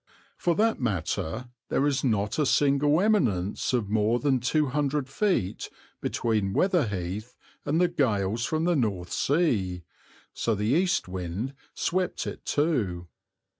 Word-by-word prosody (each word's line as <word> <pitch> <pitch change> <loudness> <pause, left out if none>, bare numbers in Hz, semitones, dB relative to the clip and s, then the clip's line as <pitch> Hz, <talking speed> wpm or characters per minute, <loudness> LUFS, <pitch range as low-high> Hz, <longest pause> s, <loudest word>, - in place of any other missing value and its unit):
For 170 -1 0
that 225 +4 +2
matter 110 +1 -2 0.2
there 140 - +2
is 145 -2 +1
not 105 -1 0
a 150 - +3
single 145 +2 +3
eminence 115 - +1
of 115 -5 -1
more 110 +2 +2
than 135 -2 +2
200 145 +1 0
feet 160 - -1 0.3
between 105 -4 0
Weather 180 - +2
Heath 100 +4 -4 0.3
and 155 +3 +1
the 180 - +4
gales 115 - 0
from 155 +5 0
the 175 0 +2
North 100 - -1
Sea, 105 - +1 0.5
so 115 - 0
the 105 +1 -2
east 170 - +2
wind 95 +7 -4 0.2
swept 185 +1 -1
it - - -7
too. 105 - 0
125 Hz, 135 wpm, -27 LUFS, 100-150 Hz, 0.5 s, the